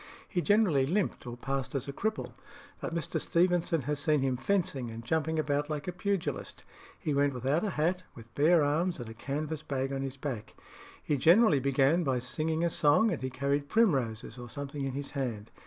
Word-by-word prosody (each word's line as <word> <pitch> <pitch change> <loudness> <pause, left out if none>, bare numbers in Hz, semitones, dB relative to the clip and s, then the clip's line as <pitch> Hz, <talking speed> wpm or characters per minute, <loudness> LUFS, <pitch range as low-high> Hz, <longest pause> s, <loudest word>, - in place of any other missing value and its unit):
He 175 - -1
generally 185 -10 +3
limped 180 -5 -1
or 120 0 -6
passed 135 +2 -3
as 135 - -2
a 140 - -4
cripple; 220 +8 -2 0.5
but - - -4
Mr. 165 -1 -2
Stevenson 170 -2 +2
has 145 +3 -2
seen 150 -1 +2
him 130 -1 +1
fencing 135 -4 0
and 115 +1 -8
jumping 160 +3 0
about 145 -1 0
like 150 0 -4
a - - 0
pugilist. 195 0 -3 0.3
He 150 - -2
went 140 -1 +2
without 135 - 0
a 210 - 0
hat, 175 +2 0
with 115 0 -13
bare 155 +3 +4
arms, 165 +5 +1
and 120 -2 -6
a - - -7
canvas 145 +6 -4
bag 135 0 -2
on 135 - -2
his 135 0 -4
back. 130 -6 -5 0.5
He 145 - 0
generally 170 - +5
began 140 +5 +3
by 135 -4 +1
singing 155 +6 -1
a 170 - +3
song, 155 +11 +4
and 165 - -3
he 130 - -2
carried 140 +2 -1
primroses 130 - +1
or 120 0 -8
something 140 +2 -5
in 135 - -3
his 140 +1 -4
hand. 120 -7 -4
145 Hz, 200 wpm, -30 LUFS, 135-165 Hz, 0.5 s, generally